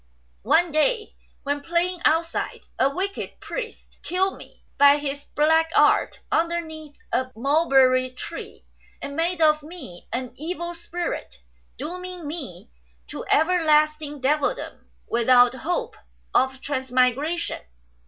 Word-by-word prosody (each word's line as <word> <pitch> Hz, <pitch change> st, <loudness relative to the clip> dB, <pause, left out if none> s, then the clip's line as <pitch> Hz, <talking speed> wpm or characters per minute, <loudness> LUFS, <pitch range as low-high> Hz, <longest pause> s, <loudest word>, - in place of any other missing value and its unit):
One 345 Hz, -1 st, +4 dB
day, 430 Hz, +9 st, +1 dB, 0.3 s
when 285 Hz, 0 st, -1 dB
playing 345 Hz, +3 st, -1 dB
outside, 330 Hz, +1 st, +1 dB, 0.2 s
a 265 Hz, -, +4 dB
wicked 385 Hz, +7 st, -4 dB
priest 475 Hz, -3 st, -7 dB
killed 380 Hz, +2 st, 0 dB
me -, -, -15 dB, 0.2 s
by 285 Hz, 0 st, +7 dB
his 285 Hz, 0 st, -4 dB
black 320 Hz, +2 st, +4 dB
art -, -, +3 dB
underneath 320 Hz, -3 st, -2 dB, 0.2 s
a 255 Hz, 0 st, +1 dB
mulberry 265 Hz, -1 st, +3 dB
tree, 255 Hz, -, -9 dB, 0.3 s
and 280 Hz, -, -6 dB
made 335 Hz, +1 st, 0 dB
of 305 Hz, 0 st, +4 dB
me 300 Hz, -, -10 dB
an 245 Hz, +2 st, -3 dB
evil 345 Hz, +3 st, -4 dB
spirit, 345 Hz, +1 st, -5 dB, 0.3 s
dooming 360 Hz, +3 st, -6 dB
me 285 Hz, -, -7 dB, 0.4 s
to -, -, -6 dB
everlasting 305 Hz, -3 st, +2 dB
devildom 290 Hz, +2 st, -1 dB, 0.2 s
without 245 Hz, +1 st, +5 dB
hope 430 Hz, -, -3 dB, 0.4 s
of 265 Hz, +1 st, +2 dB
transmigration. 260 Hz, +4 st, 0 dB
305 Hz, 115 wpm, -24 LUFS, 270-345 Hz, 0.4 s, by